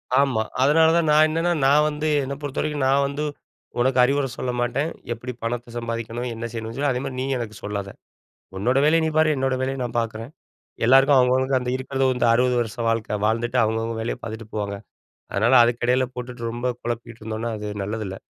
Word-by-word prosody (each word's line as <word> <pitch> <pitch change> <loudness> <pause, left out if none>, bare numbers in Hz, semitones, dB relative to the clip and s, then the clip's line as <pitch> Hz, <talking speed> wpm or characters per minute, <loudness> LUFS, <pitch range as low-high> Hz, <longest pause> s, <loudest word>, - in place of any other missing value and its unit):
ஆமா, 135 -4 +3 0.2
அதனால 160 +4 +5
தான் 165 -2 +1
நான் 155 +1 +6
என்னன்னா, 165 +2 0
நான் 150 +2 +5
வந்து 150 +1 -3 0.2
என்ன 135 +1 -4
பொறுத்த 145 -2 -4
வரைக்கும் 150 -2 -1
நான் 140 +1 +3
வந்து 140 +2 -3 0.6
உனக்கு 125 +1 +2
அறிவுர 140 +2 +2
சொல்ல 125 - -2
மாட்டேன். 135 +6 0 0.2
எப்டி 125 +2 -7
பணத்த 120 0 -4
சம்பாதிக்கணும்? 115 +1 -4
என்ன 115 +1 -5
செய்யணும்னு 115 0 -6
சொல்லிட்டு. 140 0 +1
அதே 125 - -2
மாரி 130 - -5
நீ - - -1
எனக்கு 115 -3 -5
சொல்லாத. 100 -1 -4 0.7
உன்னோட 120 +7 +1
வேலைய 165 +2 +4
நீ - - +1
பாரு, 155 0 +4
என்னோட 130 0 0
வேலைய 135 +1 -1
நான் 120 -1 -3
பார்க்றேன். 115 +3 -4 0.6
எல்லாருக்கும் 135 +3 +6
அவங்க 125 0 +4
அவங்களுக்கு 130 0 +2
அந்த 125 0 -3
இருக்கிறது 135 +1 -2
வந்து 125 -1 +1
60 125 +1 +2
வருஷ 110 -3 -4
வாழ்க்க, 110 -2 -1
வாழ்ந்துட்டு 120 +3 0
அவங்கவங்க 115 +1 -1
வேலைய 115 - -2
பார்த்துட்டு 110 -1 -7
போவாங்க. 100 -1 -3 0.6
அதனால 110 +6 +2
அதுக்கு 120 0 0
எடைல 130 +1 +3
போட்டுட்டு 125 -1 -7
ரொம்ப 120 +2 -3
குழப்பிட்ருந்தோம்னா 115 -1 -4
அது 105 0 -6 0.2
நல்லது 110 +2 -4
இல்ல. 95 - -6
125 Hz, 190 wpm, -23 LUFS, 115-135 Hz, 0.7 s, நான்